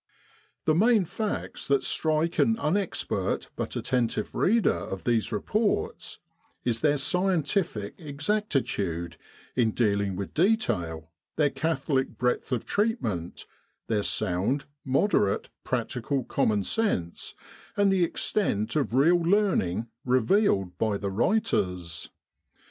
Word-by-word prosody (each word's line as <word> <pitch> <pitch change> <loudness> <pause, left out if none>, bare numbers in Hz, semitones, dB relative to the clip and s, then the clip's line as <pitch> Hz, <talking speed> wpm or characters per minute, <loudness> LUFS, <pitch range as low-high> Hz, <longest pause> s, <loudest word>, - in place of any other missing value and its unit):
The 155 - +4
main 215 +3 +4
facts 215 +5 -4
that 140 -1 +2
strike 160 +1 0
an 225 0 +4
unexpert 190 0 -1
but - - -4
attentive 120 -4 -1
reader 225 +3 +3
of 95 -1 -5
these 115 -2 +1
reports 200 - -1 0.5
is 115 -2 0
their 150 -1 +3
scientific 175 - 0
exactitude 140 - -2 0.4
in 120 -3 +3
dealing 100 -4 +1
with 100 0 -5
detail, 95 - 0 0.2
their 145 -3 +2
catholic 135 -4 -1
breadth 125 +2 0
of 125 -3 -1
treatment, 115 - -1 0.4
their 110 -2 0
sound, 100 +9 0 0.2
moderate, 130 - +1
practical 130 +2 -2
common 105 -3 +1
sense, 95 - -1 0.4
and 200 -1 +4
the 185 -2 +3
extent 120 - 0
of 140 -5 0
real 165 +6 +5
learning 170 - +1 0.2
revealed 125 - +2
by 110 -2 +1
the 100 -1 -3
writers. 90 - 0
135 Hz, 110 wpm, -27 LUFS, -, 0.5 s, real